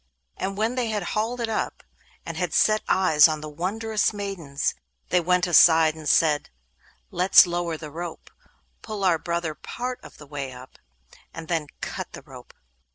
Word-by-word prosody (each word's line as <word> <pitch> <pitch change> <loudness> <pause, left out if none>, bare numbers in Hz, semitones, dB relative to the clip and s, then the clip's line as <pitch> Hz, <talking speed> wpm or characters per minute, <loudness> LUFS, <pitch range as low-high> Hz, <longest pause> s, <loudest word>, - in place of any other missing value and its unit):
And 195 +1 -4
when 220 +3 0
they 250 -2 -1
had 210 -3 -2
hauled 225 +4 -1
it 230 - -1
up, 220 -1 -3 0.4
and - - -6
had - - -2
set 215 0 +3
eyes 160 -6 +5
on 155 -1 -3
the 155 - -6
wondrous 210 +8 -1
maidens, 190 -9 -3 0.4
they 180 - +3
went 180 +1 +2
aside 165 -2 +6
and 155 -2 -5
said: 150 -3 +3 0.6
'Let's 180 +2 +6
lower 175 -2 -2
the 155 -1 -9
rope, 170 +1 -8 0.5
pull 215 -2 -6
our 175 -4 +3
brother 170 -2 -2
part 250 - -6
of - - -14
the 150 - -12
way 140 -2 -6
up, 125 +1 -14 0.6
and 165 -1 -8
then 160 -3 -1
cut - - -6
the - - -10
rope. - - -14
175 Hz, 170 wpm, -24 LUFS, 155-210 Hz, 0.6 s, aside